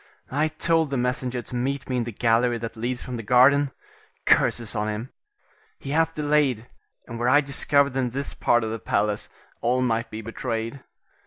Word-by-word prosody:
I 150 +4 +1
told 160 0 +1
the 135 - -1
messenger 125 0 -1
to - - -8
meet 135 +3 -2
me 130 - -1
in 120 - 0
the 120 - -5
gallery 120 +2 +2
that 115 0 -6
leads 120 +3 -3
from 125 -1 -5
the - - -4
garden. 130 +5 +5 0.6
Curses 115 -3 +3
on 105 0 -1
him! 110 +5 -5 0.6
he 135 - -7
hath 165 +1 +1
delayed, 145 -6 +1 0.4
and 115 -1 -7
were 120 +1 +1
I 145 +3 +6
discovered 140 -1 +2
in 130 -2 0
this 140 +4 -4
part 120 -1 +2
of 110 - -3
the 115 - -4
palace, 105 0 -1 0.3
all 125 +2 +1
might 115 0 0
be 110 +1 -7
betrayed. 115 +2 -4
125 Hz, 185 wpm, -24 LUFS, 115-140 Hz, 0.6 s, I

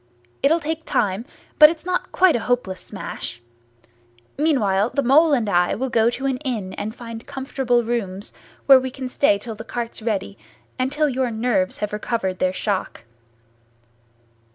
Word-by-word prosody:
It'll 320 +4 +3
take 320 +1 -4
time, 205 -4 0 0.3
but 300 0 +11
it's 330 +1 -6
not 365 0 -2
quite 370 -3 +4
a - - +1
hopeless 235 -7 -1
smash. 190 - -7 1.0
Meanwhile, 225 -9 +2
the 280 - +2
Mole 300 +6 +5
and 240 -6 +2
I 175 -2 +2
will 260 +2 -3
go 225 0 +4
to 260 +3 -5
an 265 -2 0
inn 235 -9 -4
and 215 +2 -5
find 230 -1 -9
comfortable 265 -3 0
rooms 205 -4 -3 0.3
where 270 -1 +8
we 260 0 -3
can 260 0 -6
stay 250 -5 +3
till 225 +3 -7
the 215 - -9
cart's 235 -1 -5
ready, 210 -3 -3 0.4
and 255 +1 0
till 300 +1 +1
your 260 -2 0
nerves 220 -4 0
have 210 - -12
recovered 210 -3 -2
their 185 - +2
shock." 190 - -3
240 Hz, 165 wpm, -22 LUFS, 205-270 Hz, 1.0 s, but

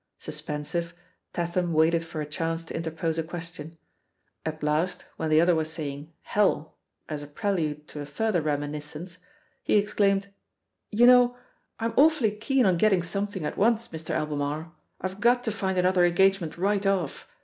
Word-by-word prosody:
Suspensive, 170 +3 -4 0.4
Tatham 175 0 -1
waited 165 +1 +3
for 160 -1 -5
a - - -2
chance 165 +2 -3
to - - -7
interpose 165 0 -2
a - - 0
question. 165 -1 -7 0.7
At 155 -1 -5
last, 155 +4 0
when 160 - -2
the 155 0 +5
other 175 +2 +5
was 160 -1 -1
saying 145 -1 -6
"Hell," 195 -6 +1 0.3
as 150 -2 -4
a 145 - -8
prelude 155 -4 -2
to 150 - -8
a 145 - -5
further 180 +4 0
reminiscence, 150 +3 -4 0.4
he - - +1
exclaimed: 200 -1 +2 0.6
"You 230 +3 +4
know, 245 0 +6 0.4
I'm 230 0 -1
awfully 285 -6 +5
keen 240 +5 +1
on 185 -3 +3
getting 190 -2 +3
something 195 -1 -2
at - - -4
once, 230 +2 +2
Mr, 160 0 -8
Albemarle! 150 +2 -2 0.3
IVe 190 +1 -4
got 245 +3 +3
to 220 - -1
find 190 -3 -2
another 180 0 +3
engagement 175 -1 +3
right 200 +2 +1
off. 185 -7 -1
170 Hz, 160 wpm, -27 LUFS, 155-200 Hz, 0.7 s, know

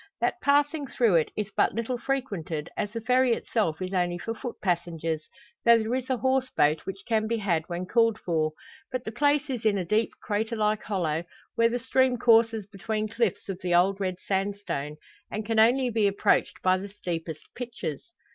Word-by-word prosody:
That 360 - 0
passing 290 +1 +2
through 235 -7 +2
it 155 - +1
is 210 -1 -2
but - - +2
little 235 +2 -2
frequented, 195 - -3
as 205 - -2
the 230 +1 -4
ferry 250 +2 +3
itself 205 -9 -1
is 185 +1 -5
only 175 -1 +1
for 225 +6 -4
foot 240 +1 -6
passengers, 165 -3 -1 0.4
though 235 0 +7
there 225 +1 -1
is 260 0 -2
a 260 - +1
horse 260 +1 +1
boat 150 -8 +1
which 195 0 -6
can 220 -2 +1
be 230 +1 0
had 175 -7 0
when 175 +1 -3
called 230 +2 +3
for. 155 -3 0 0.4
But 255 -1 -3
the 220 - -5
place 290 +3 +2
is 255 -5 -4
in 215 -2 +3
a 185 - -2
deep 215 +5 +2
crater 220 +2 -2
like 215 -1 +1
hollow, 170 -5 -1 0.3
where 230 0 +3
the 240 - -1
stream 260 0 +2
courses 225 -2 +4
between 215 +2 -3
cliffs 230 -3 -1
of 195 -2 -5
the 180 -1 +1
old 190 +3 +3
red 185 -2 -1
sandstone, 195 -7 -2 0.3
and 215 0 -4
can 225 0 +1
only 245 +3 +4
be 215 -2 +3
approached 200 0 +1
by 185 0 +3
the 200 +2 -7
steepest 165 -6 -5
"pitches." 235 - -5
215 Hz, 195 wpm, -27 LUFS, 180-235 Hz, 0.4 s, though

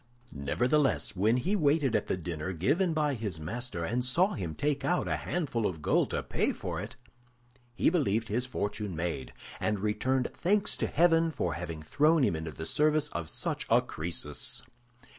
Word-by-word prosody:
Nevertheless, 125 - +1
when 110 +6 +3
he 185 +11 0
waited 145 - +2
at 105 - 0
the - - 0
dinner 85 0 -4
given 160 - +2
by 150 -2 +1
his 105 -9 -4
master, 90 +2 -4
and 125 +7 0
saw 170 +11 +2
him 85 -6 -4
take 145 -1 0
out 175 +6 +1
a - - +1
handful 135 -11 -1
of 80 -5 -6
gold - - +2
to - - -2
pay - - 0
for - - -4
it, - - -7 0.8
he - - +3
believed 115 - +1
his 120 +4 0
fortune 105 -5 -3
made, 80 -4 -3 0.3
and 105 -1 0
returned 125 +5 0
thanks 200 +3 +1
to - - 0
heaven 165 0 +4
for 90 - -2
having 80 -1 -5
thrown 150 - +3
him 85 - +2
into 80 0 -4
the 80 +2 -7
service 150 - +2
of 85 - -4
such - - -3
a - - +6
Crœsus. 80 -3 -3
120 Hz, 180 wpm, -30 LUFS, -, 0.8 s, a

